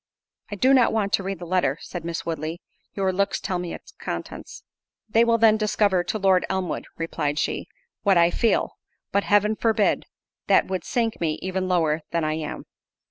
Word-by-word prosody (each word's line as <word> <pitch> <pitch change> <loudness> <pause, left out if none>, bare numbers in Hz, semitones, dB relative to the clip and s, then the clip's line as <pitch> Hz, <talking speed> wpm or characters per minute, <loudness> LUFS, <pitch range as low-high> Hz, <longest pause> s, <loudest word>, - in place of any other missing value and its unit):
"I 205 - -4
do 260 +6 +4
not 255 -3 +5
want 210 -2 -1
to - - +3
read 195 +1 -4
the 175 - -8
letter," 185 +1 +1
said 175 -3 -7
Miss 170 0 -4
Woodley; 160 +1 -3 0.4
"your 190 -1 0
looks 200 +2 0
tell 180 -2 -2
me 175 -1 -4
its - - -13
contents." - - -6 0.4
"They 225 +1 +4
will 230 0 +3
then 220 -1 +5
discover 205 -3 +2
to 215 - -2
Lord 190 -3 +3
Elmwood," 190 -3 -2
replied 150 -3 -2
she, - - -1 0.3
"what 195 -3 +3
I 170 0 +5
feel; 230 - 0 0.3
but 200 - +1
Heaven 205 +1 +3
forbid—that 220 -2 0
would 185 -1 -3
sink 230 -6 -1
me 155 -2 0
even 185 0 -2
lower 165 -4 +1
than 170 -1 -1
I 155 0 0
am." 155 -1 -5
190 Hz, 185 wpm, -24 LUFS, 170-210 Hz, 0.4 s, not